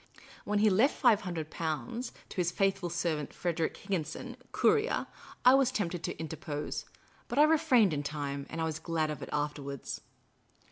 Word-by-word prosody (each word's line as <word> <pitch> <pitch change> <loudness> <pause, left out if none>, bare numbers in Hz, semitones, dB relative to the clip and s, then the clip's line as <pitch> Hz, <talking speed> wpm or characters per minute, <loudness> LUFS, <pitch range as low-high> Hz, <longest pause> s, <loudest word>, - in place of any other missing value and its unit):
When 210 0 +1
he 210 0 +5
left 225 +10 +4
Five 235 -6 +4
Hundred 165 -4 -4
Pounds 225 +10 -3 0.2
to - - -10
his 175 -2 +2
faithful 195 0 +1
servant 165 -3 -1
Frederic 170 -2 -1
Higginson, 195 +6 -3 0.2
courier, 440 +2 +2 0.4
I 250 - +9
was 270 -2 +4
tempted 175 -8 -2
to - - -4
interpose; 155 -2 -4 0.4
but 240 - -4
I 295 - +8
refrained 295 - +5
in 145 - -1
time, 140 -1 -4
and 165 - -5
I - - +1
was 160 -1 -2
glad 160 -2 -1
of 145 -2 -6
it - - -6
afterwards. 145 -2 -3
175 Hz, 170 wpm, -31 LUFS, 155-225 Hz, 0.4 s, I